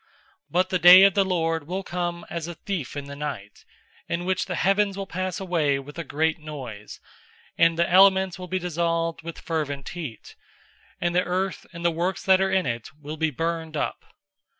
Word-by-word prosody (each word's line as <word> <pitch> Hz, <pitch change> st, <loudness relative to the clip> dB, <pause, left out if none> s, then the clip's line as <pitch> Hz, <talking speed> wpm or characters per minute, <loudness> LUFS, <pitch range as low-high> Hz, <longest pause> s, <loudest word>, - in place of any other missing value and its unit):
003:010 -, -, -37 dB, 0.4 s
But 185 Hz, +2 st, +1 dB
the 185 Hz, -, 0 dB
day 180 Hz, +2 st, +10 dB
of 195 Hz, -1 st, +6 dB
the 200 Hz, -, +3 dB
Lord 165 Hz, -5 st, -1 dB
will 190 Hz, +3 st, -3 dB
come 175 Hz, -1 st, -3 dB
as 170 Hz, -1 st, -5 dB
a 175 Hz, -, -6 dB
thief 160 Hz, -, -5 dB
in 140 Hz, -, -4 dB
the 140 Hz, 0 st, -8 dB
night; 140 Hz, -9 st, -6 dB, 0.5 s
in 175 Hz, +1 st, -2 dB
which 185 Hz, +1 st, 0 dB
the 180 Hz, -, -3 dB
heavens 195 Hz, +3 st, +2 dB
will 195 Hz, -, -3 dB
pass 185 Hz, 0 st, -3 dB
away 165 Hz, -7 st, +1 dB
with 145 Hz, +4 st, -9 dB
a -, -, -2 dB
great 160 Hz, +3 st, 0 dB
noise, 130 Hz, -9 st, -8 dB, 0.6 s
and 165 Hz, 0 st, +4 dB
the 170 Hz, -, +2 dB
elements 190 Hz, 0 st, +5 dB
will 180 Hz, -, -7 dB
be 185 Hz, -, -1 dB
dissolved 165 Hz, -1 st, -1 dB
with 165 Hz, 0 st, -7 dB
fervent 145 Hz, -4 st, -3 dB
heat, 155 Hz, -11 st, -8 dB, 0.6 s
and 175 Hz, 0 st, 0 dB
the 180 Hz, -, +5 dB
earth 185 Hz, +1 st, -2 dB
and 170 Hz, -1 st, -8 dB
the 170 Hz, -, +4 dB
works 175 Hz, +3 st, -2 dB
that 190 Hz, 0 st, +5 dB
are 190 Hz, -, +2 dB
in 190 Hz, -3 st, +2 dB
it 115 Hz, -3 st, -3 dB
will 150 Hz, +1 st, -7 dB
be 160 Hz, 0 st, +1 dB
burned 165 Hz, +1 st, -3 dB
up. -, -, -3 dB
170 Hz, 200 wpm, -25 LUFS, 155-185 Hz, 0.6 s, day